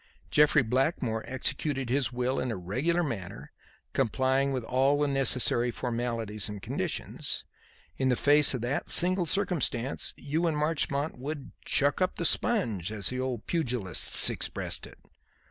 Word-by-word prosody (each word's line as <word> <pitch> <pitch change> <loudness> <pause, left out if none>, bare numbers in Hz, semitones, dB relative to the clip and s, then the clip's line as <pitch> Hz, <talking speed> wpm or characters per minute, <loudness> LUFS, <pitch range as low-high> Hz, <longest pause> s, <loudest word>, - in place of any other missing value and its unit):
Jeffrey 150 -2 +4
Blackmore 125 -2 -1
executed 135 +1 -2
his 130 +1 -1
will 125 +2 -2
in 130 - -3
a - - -3
regular 130 - -1
manner, 95 - -6 0.4
complying 130 +2 0
with 130 -3 -3
all 135 +4 +1
the 145 - +1
necessary 130 -3 +3
formalities 115 -4 -4
and 105 -1 -7
conditions. - - -4 0.5
In 130 -1 0
the 125 - +2
face 145 +1 +4
of 125 - -5
that 125 +4 -3
single 180 0 +4
circumstance 155 - -1
you 160 +4 -2
and 155 -2 -1
Marchmont 150 -2 -2
would 145 +1 -6
'chuck 145 +5 +1
up 185 - 0
the 170 - -2
sponge,' 115 - +1
as 105 -2 0
the 130 - -4
old 130 -4 -4
pugilists 125 - +4
expressed - - -2
it. - - -16
130 Hz, 145 wpm, -28 LUFS, 120-150 Hz, 0.5 s, Jeffrey